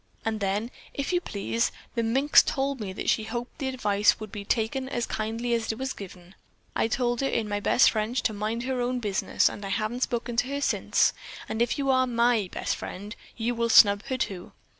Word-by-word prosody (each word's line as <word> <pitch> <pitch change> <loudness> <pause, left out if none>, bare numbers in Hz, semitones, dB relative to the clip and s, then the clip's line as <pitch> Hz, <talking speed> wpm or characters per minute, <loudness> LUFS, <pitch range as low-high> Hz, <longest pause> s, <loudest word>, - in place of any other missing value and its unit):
And 220 -1 -1
then, 205 +4 -1 0.2
if 280 +5 -2
you 355 - +2
please, 230 - -1 0.2
the 235 - 0
minx 265 +6 +5
told 275 0 -1
me 205 -4 -4
that 190 - -6
she 220 - +2
hoped 240 +5 -6
the 270 - -2
advice 210 -6 +2
would 215 -2 -8
be 205 - -6
taken 235 +5 -1
as 240 -3 -1
kindly 225 +2 -2
as 230 -1 0
it 220 - -6
was 265 +1 -3
given. 180 -2 -11 0.4
I - - +2
told 240 +1 0
her 270 - +1
in 225 -4 -1
my 205 0 -1
best 245 - +4
French 225 +3 -1
to 220 - +1
mind 215 +3 -2
her 255 -1 -1
own 250 +1 0
business, 205 -4 +1
and 205 - -4
I 195 - -4
haven't 215 +5 -2
spoken 240 -1 -2
to 245 +1 +2
her 280 +1 -3
since, - - +2 0.3
and 220 - -3
if 240 - +1
you 275 -1 +1
are 260 0 +3
my 235 -3 +2 0.2
friend, 205 +4 -4 0.2
you 235 +1 0
will 235 0 0
snub 205 -2 +7
her 260 - -1
too. 190 -7 -4
230 Hz, 215 wpm, -27 LUFS, 210-255 Hz, 0.4 s, snub